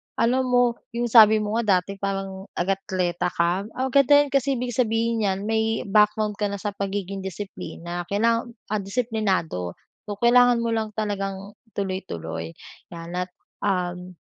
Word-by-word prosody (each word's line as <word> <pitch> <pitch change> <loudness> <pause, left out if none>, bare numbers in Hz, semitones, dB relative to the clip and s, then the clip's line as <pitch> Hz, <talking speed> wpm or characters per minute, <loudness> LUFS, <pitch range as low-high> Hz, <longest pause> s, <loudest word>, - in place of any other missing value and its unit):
alam 255 +2 +2
mo 245 -1 +2 0.2
yung 240 -1 -1
sabi 220 -2 +7
mo 210 +2 -1
nga 210 -5 +3
dati 195 +1 -9
parang 195 0 -4
atleta 180 -1 -1
ka, 175 +4 +1
ah, 260 +1 -1
ganda 280 +1 +6
'yan 285 - -8
kasi 275 0 +2
ibig 245 0 -3
sabihin 230 -1 +1
nyan 195 -2 0
may 220 +1 0
background 210 0 +2
ka 210 - +1
na 200 - -4
sa 205 +1 -3
pagiging 200 -1 -4
disiplina 175 -2 -6
kailangan, 230 +4 +1 0.2
ah, 215 - +1
disiplinado 195 - -1 0.3
so, 205 - -3
kailangan 245 0 +5
mo 230 - 0
lang 220 -2 -2
talagang 195 -2 -3 0.2
tuloy, 190 -2 -2
tuloy 165 - -6 0.4
yan. 170 0 -8
At, 180 0 -2 0.3
uhm, 180 -2 -2
205 Hz, 155 wpm, -24 LUFS, 190-230 Hz, 0.4 s, sabi